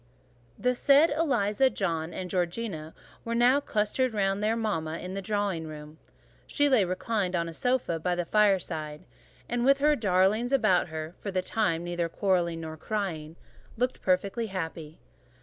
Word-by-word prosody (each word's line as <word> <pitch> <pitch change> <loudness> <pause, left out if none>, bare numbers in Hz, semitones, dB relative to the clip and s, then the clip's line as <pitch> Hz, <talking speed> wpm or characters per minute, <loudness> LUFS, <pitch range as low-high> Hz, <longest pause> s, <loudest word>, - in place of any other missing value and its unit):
The 250 0 +1
said 285 +5 +5
Eliza, 265 -6 +2
John, 165 -7 -2
and 185 - -5
Georgiana 175 -3 -3 0.3
were 230 0 -3
now 245 +4 +5
clustered 230 0 -1
round 195 0 0
their 215 +2 +1
mama 165 -8 -2
in 185 +2 -7
the 195 - -3
drawing 195 -5 -2
room: 150 0 -10 0.5
she 290 -1 +2
lay 255 -7 +4
reclined 185 +1 -1
on 170 -1 0
a 165 - -7
sofa 245 -5 0
by 175 +2 0
the 175 -1 -2
fireside, 170 -7 0 0.4
and 240 0 -1
with 275 +2 +5
her 295 +2 +3
darlings 205 +2 +2
about 215 -11 +3
her 160 0 -6
(for 205 - -4
the 185 -1 -1
time 180 -6 0
neither 175 -1 -2
quarrelling 175 -3 0
nor 160 -1 -7
crying) 165 -6 -4 0.4
looked 250 +2 -1
perfectly 195 +5 0
happy. 165 -4 -6
195 Hz, 160 wpm, -28 LUFS, 170-230 Hz, 0.5 s, said